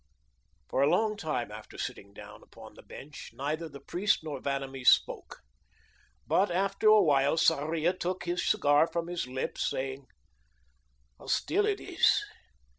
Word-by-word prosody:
For 130 - -1
a 140 - +4
long 215 +5 +2
time 155 - -3
after 105 0 -11
sitting 100 - -6
down 100 - -12
upon - - -14
the - - -15
bench, 145 +1 -11
neither 155 +4 -3
the 140 -1 -11
priest 180 +6 0
nor 150 -4 -5
Vanamee 135 -1 -4
spoke. 130 - +2 0.8
But 195 +1 +2
after 195 +4 0
a 215 -1 +7
while 145 -1 +3
Sarria 160 +2 +2
took 185 0 -4
his 175 0 -2
cigar 150 -6 +3
from 170 0 -3
his 175 -5 -4
lips, 130 +1 -3
saying: 135 0 -5 1.1
"How - - -14
still 410 +3 +1
it 410 -1 0
is! - - +2
160 Hz, 150 wpm, -29 LUFS, 140-180 Hz, 1.1 s, a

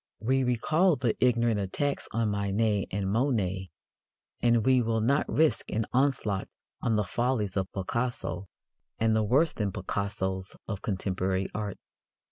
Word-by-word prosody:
We 130 +4 +1
recall 155 +9 +3
the 120 -4 0
ignorant 120 -3 +3
attacks 140 +9 -2
on 115 -2 0
Manet 100 +1 0
and 100 0 -2
Monet, 100 -5 0 0.7
and 120 -2 +3
we 130 -1 +5
will 115 -1 0
not 140 +7 +2
risk 160 0 +2
an 110 0 0
onslaught 125 -7 +1 0.3
on 115 -2 +1
the 105 - +2
follies 115 0 -1
of 95 -1 -1
Picasso 100 -2 -3 0.5
and 110 0 +2
the 110 - +3
worse 135 +10 +3
than 105 -3 -1
Picassos 95 -1 -3
of 100 -3 -4
contemporary 95 -1 -1
art. 105 -2 -3
110 Hz, 140 wpm, -28 LUFS, 100-125 Hz, 0.7 s, we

